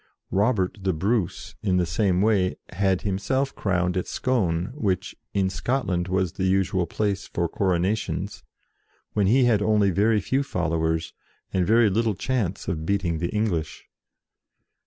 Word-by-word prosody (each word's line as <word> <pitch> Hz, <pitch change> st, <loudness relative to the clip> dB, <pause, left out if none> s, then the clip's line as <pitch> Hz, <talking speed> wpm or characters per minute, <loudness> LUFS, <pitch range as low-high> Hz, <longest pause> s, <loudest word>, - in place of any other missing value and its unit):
Robert 100 Hz, -1 st, +1 dB
the 95 Hz, -1 st, +1 dB
Bruce, 95 Hz, +3 st, -1 dB
in 95 Hz, -3 st, +1 dB
the 90 Hz, -, +2 dB
same 90 Hz, +3 st, +1 dB
way, 100 Hz, -4 st, +2 dB
had 95 Hz, 0 st, 0 dB
himself 130 Hz, +8 st, -1 dB
crowned 90 Hz, -2 st, 0 dB
at 90 Hz, -, -1 dB
Scone, 95 Hz, -7 st, 0 dB
which, 95 Hz, -, -2 dB, 0.2 s
in 95 Hz, -1 st, +2 dB
Scotland, 95 Hz, -4 st, -1 dB
was 95 Hz, -2 st, 0 dB
the 95 Hz, -, -2 dB
usual 95 Hz, -2 st, +1 dB
place 100 Hz, +2 st, -2 dB
for 85 Hz, 0 st, -1 dB
coronations, 95 Hz, +4 st, -1 dB, 0.7 s
when 100 Hz, -2 st, +2 dB
he 130 Hz, +6 st, +4 dB
had 115 Hz, -4 st, +3 dB
only 105 Hz, -2 st, +3 dB
very 105 Hz, +4 st, +3 dB
few 130 Hz, +9 st, 0 dB
followers, 80 Hz, -, -1 dB, 0.4 s
and 90 Hz, -2 st, +1 dB
very 115 Hz, +1 st, +5 dB
little 110 Hz, +1 st, +1 dB
chance 105 Hz, -5 st, -2 dB
of 80 Hz, -2 st, -2 dB
beating 85 Hz, -3 st, 0 dB
the 85 Hz, +1 st, -1 dB
English. 95 Hz, -8 st, -2 dB
95 Hz, 145 wpm, -25 LUFS, 90-110 Hz, 0.7 s, very